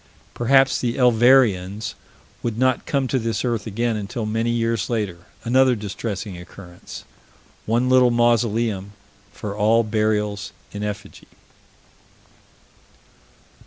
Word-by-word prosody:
Perhaps 135 +2 +3
the 120 -1 -1
Elvereans 115 -5 +3 0.5
would 115 -2 -3
not 130 0 +1
come 135 -2 0
to 130 - 0
this 115 +1 -2
earth 115 -3 -2
again 115 +2 -1
until 110 +3 -4
many 115 +2 -1
years 115 -3 0
later 100 -7 -3 0.2
another 130 +1 +4
distressing 100 -2 -5
occurrence 90 0 -11 0.6
one 120 +3 +1
little 130 -1 +5
mausoleum 115 -4 +1 0.4
for 105 -1 -6
all 110 +2 +3
burials 105 -2 -1 0.2
in 105 - -6
effigy. 105 0 -7
115 Hz, 110 wpm, -22 LUFS, 105-120 Hz, 0.6 s, little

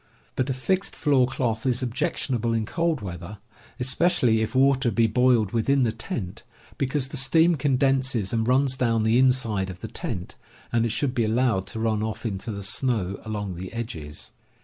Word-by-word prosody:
But 130 +1 -1
a - - +1
fixed 190 +9 -1
floor 135 -4 +3
cloth 115 -4 -2
is 125 -1 +1
objectionable 125 -2 -1
in 110 -1 0
cold 165 +1 -1
weather, 90 +1 -7 0.4
especially 125 -3 +2
if 110 +3 -3
water 135 -1 +3
be 115 0 +2
boiled 115 -2 +3
within 130 +4 +2
the 115 - +1
tent, 110 -2 -6 0.4
because 135 0 0
the 145 - -3
steam 160 +6 +4
condenses 130 -6 +1
and 110 0 0
runs 130 +1 +3
down 115 -3 +1
the 110 +3 +3
inside 115 -7 +2
of 90 -1 -9
the - - -5
tent, 90 -1 -5 0.4
and 115 0 +2
it - - -3
should 125 +3 -1
be 120 -3 +1
allowed 110 -4 +1
to 115 - -6
run 110 -1 0
off 110 +2 -4
into 105 +1 -3
the 100 -1 -5
snow 100 -2 0
along 105 -3 -4
the 90 +2 -7
edges. 85 -11 -6
120 Hz, 180 wpm, -25 LUFS, 110-130 Hz, 0.4 s, steam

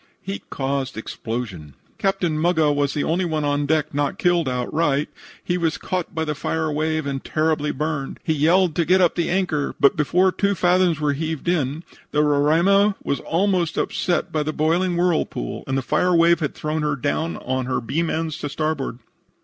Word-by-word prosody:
HEAT 195 +1 -6
CAUSED 135 -1 -2
EXPLOSIONS 110 - -5 0.3
"Captain 195 -5 0
Muggah 160 -2 +2
was 145 0 0
the 145 - 0
only 175 +4 0
one 155 -3 -1
on 145 0 0
deck 155 -1 0
not 145 -1 -1
killed 175 -8 +2
outright. 140 +3 0 0.3
He 180 0 -1
was 165 -2 0
caught 185 -1 -4
by 160 0 -1
the 150 - -1
fire 160 +2 -2
wave 155 +1 -1
and 135 -1 -3
terribly 155 -1 0
burned. 150 -1 -3
He 160 - +1
yelled 165 +4 +3
to 170 - +2
get 185 +3 +4
up 175 -3 +4
the 170 - -1
anchor, 175 -6 0
but, 140 - +5
before 180 +5 +3
two 200 +2 0
fathoms 180 -2 +2
were 150 -1 +1
heaved 160 +2 -4
in 155 -2 0 0.3
the 150 0 +2
Roraima 170 +8 +3
was 140 - -1
almost 175 -1 0
upset 175 -4 -1
by 155 - 0
the 150 +1 -1
boiling 170 +4 +1
whirlpool, 175 - -1
and 135 0 0
the 135 - -1
fire 180 +7 +2
wave 170 0 +5
had 150 -4 -2
thrown 155 +1 -2
her 150 -1 0
down 145 +5 -2
on 130 0 -3
her 130 - 0
beam 160 +8 -1
ends 160 -1 -2
to 145 - -4
starboard. 150 -4 -2
155 Hz, 190 wpm, -22 LUFS, 145-175 Hz, 0.3 s, but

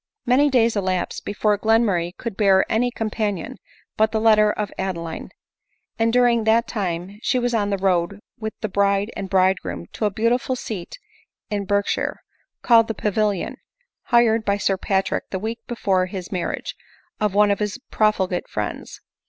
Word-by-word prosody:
Many 270 +4 +4
days 235 -4 +3
elapsed 185 -3 -2
before 210 0 0
Glenmurray 205 -6 +1
could 230 -4 -5
bear 195 -2 +4
any 240 +3 +1
companion 215 -5 -3 0.4
but 220 0 +3
the 220 - 0
letter 215 -1 +5
of 210 -1 -4
Adeline; 170 -4 -4 0.7
and 225 0 +3
during 240 -1 +3
that 225 +2 +3
time 190 -1 -4
she 255 - +1
was 245 -1 0
on 205 -3 +1
the 200 - 0
road 185 0 0 0.2
with 220 -1 -4
the 215 - -1
bride 200 +1 +1
and 195 -1 -5
bridegroom 185 - +1
to - - -2
a - - +3
beautiful 235 +5 0
seat 210 - -6 0.5
in 205 -1 -1
Berkshire, 200 +1 0 0.5
called 230 -2 +5
the 225 - -3
Pavilion, 210 -2 -1 0.5
hired 230 -2 +3
by 200 -1 +1
Sir 195 -1 +1
Patrick 190 0 -1
the 190 - -3
week 225 +4 -4
before 190 -6 0
his 185 -1 -7
marriage, 180 -3 -3 0.5
of 210 -2 0
one 205 0 +5
of 200 - 0
his 210 +1 -2
profligate 190 -4 +1
friends. 105 -1 -5
210 Hz, 160 wpm, -22 LUFS, 190-225 Hz, 0.7 s, letter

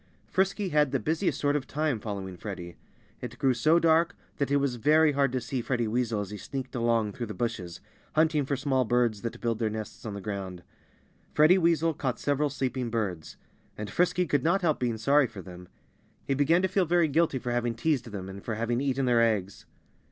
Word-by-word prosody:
Frisky 195 +1 0
had 150 -3 +3
the - - +1
busiest 165 +5 -1
sort 145 0 +1
of 145 -2 -2
time 150 -5 -1
following 100 -3 -5
Freddie. 90 -3 -7 0.5
It - - -7
grew 130 -1 +2
so 155 +8 +3
dark 165 +1 +3 0.2
that 140 - 0
it 140 - +2
was 140 -3 +1
very 150 +5 +4
hard 140 -2 +1
to 130 - -1
see 125 +1 -3
Freddie 120 -1 -1
Weasel 115 -1 0
as 100 -1 -6
he 105 - -5
sneaked 130 +5 -6
along 115 -3 +1
through 120 +1 -5
the 105 - -6
bushes, 105 -8 -4 0.3
hunting 155 -1 +3
for 140 +1 -1
small 130 -1 +1
birds 120 -3 +1
that 115 - -5
build 115 -2 -1
their 110 -2 +1
nests 110 0 -7
on 105 -3 -5
the - - -5
ground. 95 -3 -5 0.7
Freddie 160 +5 +6
Weasel 165 -1 +2
caught 130 -4 -3
several 145 +1 +1
sleeping 130 -2 -2
birds. 100 -8 -3 0.4
And 105 0 -5
Frisky 180 +1 +2
could 145 -5 0
not 175 +4 +2
help 155 -3 +2
being 120 -3 -1
sorry 140 +4 +3
for 105 -5 -10
them. 90 -1 -11 0.6
He 140 - 0
began 160 +6 +3
to - - +4
feel 190 0 +1
very 175 0 +3
guilty 155 -1 +2
for 125 -1 -4
having 120 -1 0
teased 135 +1 0
them, 100 -5 -6
and 95 +1 -9
for 115 - -3
having 120 +3 -1
eaten 135 -1 0
their 120 -2 +4
eggs. 105 -4 0
125 Hz, 210 wpm, -28 LUFS, 110-150 Hz, 0.7 s, Freddie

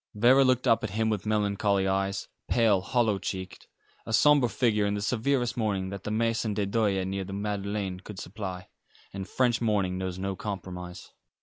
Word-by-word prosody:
Vera 125 +6 +6
looked 130 -1 +2
up 115 -2 +4
at 110 - -2
him 110 0 +2
with 105 -1 -3
melancholy 100 -2 +1
eyes, 95 +1 -1 0.2
pale, 110 -5 +3
hollow 110 -2 +1
cheeked, 95 -1 -6 0.4
a - - -7
sombre 140 +1 +5
figure 105 -4 +1
in 100 - 0
the 100 - -3
severest 120 +2 0
mourning 100 -5 -1
that 100 0 -7
the - - -2
Maison 110 -1 0
de 105 -1 0
Deuil 100 -2 +1
near 95 +1 -3
the 95 +1 -7
Madeleine 100 -2 -3
could 100 +1 -10
supply, 95 -2 -6 0.5
and 95 0 -5
French 120 -2 +1
mourning 100 -5 +1
knows 95 -1 -3
no 95 +1 -3
compromise. 90 -3 -7
105 Hz, 180 wpm, -28 LUFS, 95-115 Hz, 0.5 s, Vera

